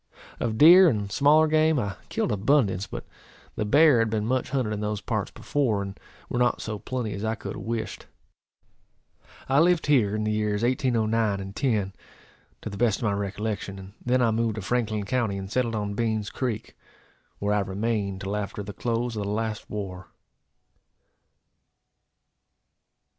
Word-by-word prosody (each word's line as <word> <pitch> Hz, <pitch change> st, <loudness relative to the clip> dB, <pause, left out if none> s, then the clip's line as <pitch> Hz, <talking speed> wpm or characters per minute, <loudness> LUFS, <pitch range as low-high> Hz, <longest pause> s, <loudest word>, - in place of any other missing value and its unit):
Of 110 Hz, -2 st, -1 dB
deer 175 Hz, +5 st, +9 dB
and 105 Hz, -5 st, -2 dB
smaller 150 Hz, +7 st, +5 dB
game 155 Hz, 0 st, +3 dB
I 100 Hz, -5 st, -2 dB
killed -, -, -1 dB
abundance; 105 Hz, -3 st, +2 dB
but -, -, -7 dB, 0.5 s
the 105 Hz, -, -1 dB
bear 145 Hz, +2 st, +5 dB
had 115 Hz, -1 st, +2 dB
been 105 Hz, -1 st, -1 dB
much 130 Hz, +2 st, 0 dB
hunted 130 Hz, -5 st, -1 dB
in 105 Hz, -, -3 dB
those 105 Hz, 0 st, -2 dB
parts -, -, -2 dB
before, 115 Hz, -9 st, -1 dB
and 100 Hz, 0 st, -8 dB, 0.3 s
were 120 Hz, -, -2 dB
not 125 Hz, 0 st, +2 dB
so 110 Hz, -2 st, -5 dB
plenty 115 Hz, -1 st, -3 dB
as 100 Hz, -, -5 dB
I 110 Hz, 0 st, 0 dB
could -, -, -6 dB
have -, -, -7 dB
wished. 115 Hz, -1 st, -4 dB, 1.4 s
I 135 Hz, +2 st, +3 dB
lived 175 Hz, +1 st, +3 dB
here 120 Hz, -9 st, +3 dB
in 110 Hz, -, -1 dB
the 110 Hz, -, 0 dB
years 105 Hz, 0 st, 0 dB
1809 115 Hz, -4 st, +1 dB
and 95 Hz, +1 st, -7 dB
'10, 105 Hz, -8 st, 0 dB, 0.7 s
to -, -, -4 dB
the 100 Hz, -, -7 dB
best 115 Hz, -2 st, +2 dB
of -, -, -8 dB
my 110 Hz, -, +2 dB
recollection, 100 Hz, 0 st, -3 dB
and 95 Hz, 0 st, -11 dB
then 125 Hz, +1 st, +2 dB
I 115 Hz, -, +3 dB
moved 115 Hz, -1 st, 0 dB
to 105 Hz, -, -5 dB
Franklin 110 Hz, -1 st, -1 dB
county, 115 Hz, -4 st, 0 dB
and 95 Hz, 0 st, -6 dB
settled 120 Hz, -2 st, 0 dB
on 105 Hz, -1 st, -2 dB
Beans 110 Hz, -1 st, -1 dB
creek, 120 Hz, -5 st, -4 dB, 0.6 s
where 100 Hz, +1 st, 0 dB
I 105 Hz, -, +2 dB
remained 100 Hz, 0 st, -2 dB
till 100 Hz, +1 st, -3 dB
after 105 Hz, 0 st, -4 dB
the 100 Hz, +1 st, -7 dB
close 120 Hz, +1 st, -2 dB
of 105 Hz, -, -2 dB
the -, -, -3 dB
last 110 Hz, 0 st, -3 dB
war. 95 Hz, -3 st, -6 dB
110 Hz, 175 wpm, -26 LUFS, 100-125 Hz, 1.4 s, deer